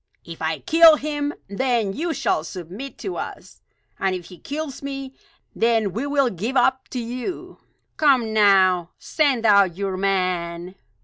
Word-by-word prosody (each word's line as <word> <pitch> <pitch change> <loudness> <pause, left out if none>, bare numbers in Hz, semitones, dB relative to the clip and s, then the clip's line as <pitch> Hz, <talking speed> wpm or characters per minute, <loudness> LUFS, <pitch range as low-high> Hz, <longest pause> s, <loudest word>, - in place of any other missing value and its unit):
If 165 -1 -10
I 160 0 -1
kill 325 - +6
him; 290 -1 -3 0.2
then 225 -1 0
you 330 - -2
shall 155 - 0
submit 185 +11 -8
to 380 - -5
us; - - -8 0.4
and 190 -1 0
if 175 -2 -8
he 180 - -13
kills 290 -1 -6
me, 275 -1 -6 0.4
then 225 -4 +1
we 245 +6 -3
will 280 -3 +2
give 225 +9 -3
up 260 0 +2
to 255 - -5
you. 245 +8 -6 0.4
Come, 255 -7 +3
now, 190 -4 +4
send 275 -7 0
out 200 -5 +4
your 195 -2 -2
man!" 180 -2 -1
225 Hz, 150 wpm, -22 LUFS, 185-275 Hz, 0.4 s, kill